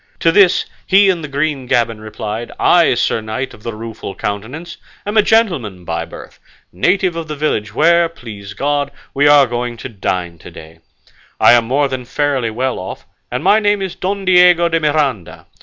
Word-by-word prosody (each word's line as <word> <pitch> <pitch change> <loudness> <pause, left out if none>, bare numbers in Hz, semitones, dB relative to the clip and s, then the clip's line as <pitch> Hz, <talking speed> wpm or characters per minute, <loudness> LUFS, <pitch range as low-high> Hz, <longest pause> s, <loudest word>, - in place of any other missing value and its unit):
To 165 - +4
this, 190 0 +4 0.2
he 195 +1 +5
in 175 -3 -4
the 150 - -6
green 140 -2 -2
gaban 115 -3 0
replied 110 +1 -6
"I, 170 -7 +4
Sir 115 -1 0
Knight 110 +5 -4
of - - -15
the 115 0 -6
Rueful 110 -3 -7
Countenance, 125 +12 -5 0.3
am 205 +1 -3
a 215 - +6
gentleman 160 - 0
by 80 - -3
birth, - - -12 0.3
native 180 - +1
of 165 -1 -5
the 150 - -5
village 110 -8 -2
where, 170 +3 +4
please 105 -10 -10
God, 145 +3 -1 0.2
we 145 +1 +3
are 145 -1 +7
going 120 0 -4
to 125 - -7
dine 90 -5 -3
to - - -11
day; 80 +1 -13 0.6
I - - +7
am 120 -1 +4
more 140 +4 +1
than 130 -2 -5
fairly 140 -3 -1
well 125 +4 -2
off, 95 - -8 0.2
and 125 +4 -4
my 200 +4 +5
name 205 -1 +1
is 190 - -4
Don 195 +1 -3
Diego 180 -2 +5
de 165 0 +1
Miranda. 145 - -1
135 Hz, 190 wpm, -16 LUFS, 110-170 Hz, 0.6 s, are